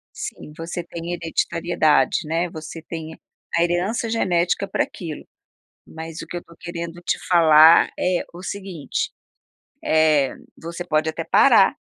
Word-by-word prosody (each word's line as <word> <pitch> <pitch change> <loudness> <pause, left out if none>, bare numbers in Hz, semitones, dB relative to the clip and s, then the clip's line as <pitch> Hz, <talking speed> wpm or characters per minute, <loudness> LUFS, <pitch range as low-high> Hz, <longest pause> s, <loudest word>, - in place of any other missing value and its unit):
Sim, 150 - -7
você 170 +1 -5
tem 170 0 -7
hereditariedade, 165 -4 +1
né, 165 +3 0
você 160 0 -8
tem 160 -1 -7 0.4
a 170 - +4
herança 180 +7 0
genética 190 -3 0
para - - 0
aquilo, 165 -5 -8 0.6
mas 160 0 -8
o - - -7
que 175 - -7
eu - - -3
estou 170 - -18
querendo 170 -1 -6
te 175 - -1
falar 160 -2 +7
é 180 -1 +1
o 175 - -9
seguinte, 190 -7 -4 0.7
eh, 155 -3 +3 0.2
você 170 +1 -6
pode 155 -1 0
até 155 - -5
parar - - +5
170 Hz, 140 wpm, -22 LUFS, 160-175 Hz, 0.7 s, falar